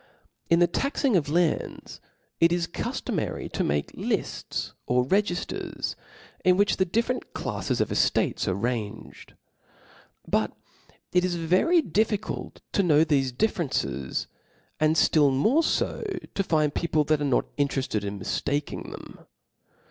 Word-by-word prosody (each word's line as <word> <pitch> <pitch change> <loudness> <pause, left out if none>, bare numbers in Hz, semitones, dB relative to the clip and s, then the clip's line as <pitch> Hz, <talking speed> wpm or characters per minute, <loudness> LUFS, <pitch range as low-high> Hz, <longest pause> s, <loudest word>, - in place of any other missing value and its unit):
In 170 - +5
the 175 - +6
taxing 275 - 0
of 150 -5 +2
lands, 170 0 -1 0.4
it 165 0 +5
i$ - - +3
cuftomary 170 -1 -3
to - - -1
make 70 0 -1
lifts - - -3
or 125 0 +2
regifters, 190 +3 -1 0.5
in 180 0 +5
which 205 0 +3
the 190 - +3
di&rent 235 +7 -1
claffi^ - - -2
of - - +1
eftates - - +1
are 95 - +1
ranged, 110 0 -4 0.9
BMt - - +1 0.6
it 180 0 +4
is 180 -1 0
very 185 - +3
difficult 210 +2 -1
to - - +2
know 160 -4 +4
theCe 135 -5 +1
differences, 145 - -1 0.5
and 155 +1 +3
ftill 150 -3 +4
more 220 - +3
fo, 335 - 0 0.3
to 195 - 0
find 155 -5 +1
people 155 -3 +1
that 150 0 +1
are - - +1
not 135 -3 0
interefted 135 -7 0
in 100 0 -4
miftaking 145 +9 -2
them. - - -10
160 Hz, 135 wpm, -26 LUFS, 140-190 Hz, 0.9 s, the